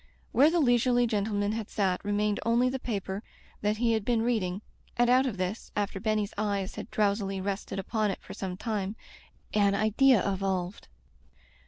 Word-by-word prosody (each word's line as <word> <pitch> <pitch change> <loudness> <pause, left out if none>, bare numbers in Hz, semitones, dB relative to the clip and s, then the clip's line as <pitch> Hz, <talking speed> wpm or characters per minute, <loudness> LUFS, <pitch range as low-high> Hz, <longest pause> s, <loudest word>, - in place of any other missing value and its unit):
Where 285 +4 +6
the 340 +1 +1
leisurely 245 -2 +3
gentleman 205 -2 0
had 220 -1 -4
sat 190 -3 0
remained 205 0 0
only 235 +3 +3
the 265 +1 -3
paper 200 -4 -3 0.4
that 210 +1 +1
he 235 0 +2
had 220 -2 0
been 230 0 +1
reading, 210 -5 -1 0.3
and 240 0 +4
out 260 +2 +5
of 215 -6 -3
this, 185 +4 -3
after 200 -1 -1
Benny's 215 0 -1
eyes 200 -3 -1
had - - -7
drowsily 200 -2 0
rested 195 +1 -3
upon 215 +2 0
it 195 - -3
for - - -9
some 185 -2 -5
time, 210 -2 -2 0.6
an 200 -1 +3
idea 220 +3 +4
evolved. 190 -1 -3
210 Hz, 170 wpm, -29 LUFS, 195-230 Hz, 0.6 s, Where